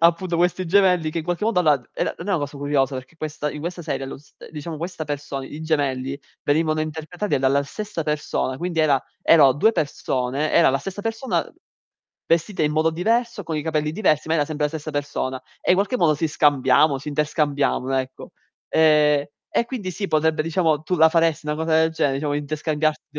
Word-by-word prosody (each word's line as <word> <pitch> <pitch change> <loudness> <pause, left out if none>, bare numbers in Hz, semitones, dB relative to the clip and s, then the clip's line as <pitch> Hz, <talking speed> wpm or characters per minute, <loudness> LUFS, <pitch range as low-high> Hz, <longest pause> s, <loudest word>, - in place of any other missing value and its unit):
appunto 170 +1 +3
questi 180 +1 +1
gemelli 180 -3 +3
che 165 - -3
in 155 - -4
qualche 175 +4 -2
modo 225 -5 +1
allora 150 -4 +4
d 120 - -24
era - - -2
non 170 - -7
è - - +1
una 180 - +2
cosa 145 0 -5
curiosa 140 -1 0
perché 130 +5 -8
questa 155 -1 -4
in 150 - -7
questa 175 +1 -5
serie 135 -3 -3
lo - - -7
s 145 - -21 0.2
diciamo 155 +1 -6
questa 170 0 -5
persona 145 -2 -5
i 150 - -9
gemelli 140 -3 -1 0.3
venivano 155 +1 +1
interpretati 160 +5 -3
dalla 135 +2 +2
stessa 210 0 -5
persona, 150 -3 -2
quindi 170 0 -3
era 140 -4 +3 0.2
erano 145 -5 +6
2 220 - +3
persone 140 - -1
era 165 - +5
la 135 - 0
stessa 195 +6 -6
persona 225 +3 -1 0.8
vestita 170 +1 +1
in 150 - +1
modo 155 +1 +2
diverso, 230 +5 0
con 160 -1 -3
i 150 - -2
capelli 155 -1 -1
diversi, 160 -7 +1
ma 160 - +2
era 150 -2 +2
sempre 150 0 -2
la - - -6
stessa 155 -1 -5
persona, 135 -2 -3 0.2
e - - -8
in 185 - +3
qualche 205 +6 +1
modo 160 -7 +3
si 160 +3 -1
scambiamo, 140 -1 +3
si 140 - -14
interscambiavano, 145 -3 0
ecco. 130 0 -6 0.4
Ehm, 150 -2 +4 0.2
e 235 - +1
quindi 220 -8 -4
sì, 200 +2 -4
potrebbe, 155 0 +2
diciamo 160 -2 +1
tu 180 +3 -1
la 160 0 +6
faresti 165 -1 +1
una 150 - 0
cosa 160 0 0
del 160 0 +3
genere, 145 -4 0
diciamo 145 0 -2
interscambiarti 150 0 -2
155 Hz, 205 wpm, -22 LUFS, 145-170 Hz, 0.8 s, erano